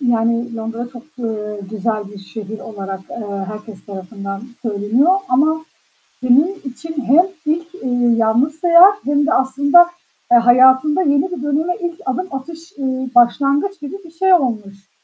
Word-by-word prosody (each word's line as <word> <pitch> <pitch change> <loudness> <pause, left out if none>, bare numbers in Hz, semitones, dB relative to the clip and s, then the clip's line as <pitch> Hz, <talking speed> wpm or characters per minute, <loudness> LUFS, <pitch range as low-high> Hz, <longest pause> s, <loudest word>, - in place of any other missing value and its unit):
Yani, 235 -1 0
Londra 230 +2 -5
çok, 240 -2 -10 0.2
eee, 210 -3 -4
güzel 215 -1 -3
bir 205 0 -11
şehir 210 +2 -8
olarak, 195 -3 -7
eee, 200 -4 -5
herkes 210 -1 -10
tarafından 195 +1 -7 0.2
söyleniyor 225 - +1 0.2
ama 315 +5 +2 0.6
senin 290 +10 +3
için 315 +5 -8
hem 305 +10 +5 0.2
ilk, 335 +3 -2
eee, 245 -6 0
yalnız 240 +8 +1
sayehat 360 +4 +6
hem 290 +1 +1
de 330 - +1
aslında, 285 +4 +4 0.4
eee, 240 - +8
hayatında 260 +7 +5
yeni 290 +2 +1
bir 285 - -5
döneme 305 +5 0
ilk 345 -2 -5
adım 260 +9 -2
atış, 325 +5 -9
eee, 260 -1 -3
başlangıç 280 +10 +2
gibi 290 +6 -7
bir 330 - -13
şey 375 +3 +2
olmuş. 210 - -1
255 Hz, 150 wpm, -18 LUFS, 220-315 Hz, 0.6 s, eee